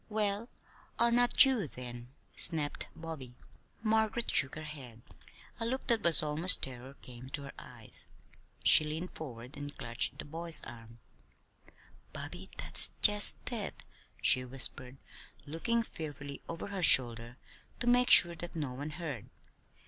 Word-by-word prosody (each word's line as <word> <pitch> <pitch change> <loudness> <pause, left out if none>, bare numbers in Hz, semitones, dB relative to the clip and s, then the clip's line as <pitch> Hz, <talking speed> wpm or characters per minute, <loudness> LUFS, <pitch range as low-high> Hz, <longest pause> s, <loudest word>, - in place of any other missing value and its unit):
"Well, 210 +1 -3 0.5
'are 235 0 +1
not 245 +3 +4
you,' 250 - -2
then," 120 -2 -11 0.3
snapped 155 -4 +2
Bobby. 155 -7 -10 0.5
Margaret 220 +1 -1
shook 135 - 0
her 155 - -9
head. 130 -7 -11 0.6
A 230 - -3
look 260 +3 -5
that 230 -2 0
was 170 -2 +5
almost 155 +4 +2
terror 130 +1 -9
came 125 +1 -13
to 140 +1 -4
her 140 - -10
eyes. - - -9 0.6
She - - +7
leaned 160 +4 -6
forward 125 -3 -10
and 145 0 -10
clutched 115 0 -4
the - - -9
boy's 165 +2 -1
arm. 115 -1 -13 1.2
"Bobby, - - -9
that's - - +8
just 210 0 +4 0.2
it," 215 -5 -6 0.4
she 130 -1 +3
whispered, 125 0 -1 0.5
looking 230 +11 -3
fearfully 145 - -10
over 165 +4 -8
her 195 -2 -6
shoulder 120 -5 +3 0.4
to 245 - -4
make 245 +1 +2
sure 170 -1 +7
that 175 +1 -11
no 145 -6 -5
one 145 +4 -8
heard. 150 - -9
155 Hz, 140 wpm, -30 LUFS, 130-200 Hz, 1.2 s, that's